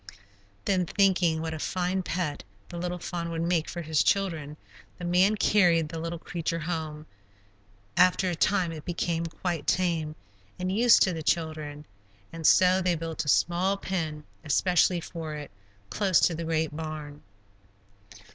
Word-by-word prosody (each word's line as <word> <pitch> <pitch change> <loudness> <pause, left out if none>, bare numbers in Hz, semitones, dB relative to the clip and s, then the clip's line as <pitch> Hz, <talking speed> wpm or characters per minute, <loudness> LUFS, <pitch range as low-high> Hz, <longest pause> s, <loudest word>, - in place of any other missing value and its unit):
Then, 185 -3 +1
thinking 180 -5 +2
what 160 0 -3
a 160 - -5
fine 185 +3 -1
pet 175 -5 -3 0.3
the 175 - -6
little 180 0 -3
fawn 170 -1 -4
would 165 0 -2
make 170 -2 0
for 175 - -5
his 155 -1 +1
children, 165 -7 0 0.4
the 175 - -6
man 185 +4 +3
carried 175 -7 +3
the 165 0 -5
little 165 +1 -4
creature 165 0 -3
home. 155 -2 -4 0.9
After 185 +1 +4
a 175 - -1
time 180 0 +1
it 155 -2 -8
became 170 -1 -2
quite 165 -2 -4
tame 165 -4 0 0.4
and 185 +1 -2
used 235 +1 +6
to 185 - +1
the 165 - -4
children, 155 -2 -2 0.5
and 165 -1 0
so 185 0 +5
they 180 -1 +1
built 165 -1 -4
a - - -10
small 180 +6 +2
pen 160 -6 -3 0.2
especially 175 +3 +2
for 160 -2 -6
it, 145 -5 -8 0.4
close 195 -4 +3
to 175 - +3
the 165 +1 -4
great 160 -2 -1
barn. 155 -2 -6
170 Hz, 155 wpm, -27 LUFS, 160-180 Hz, 0.9 s, used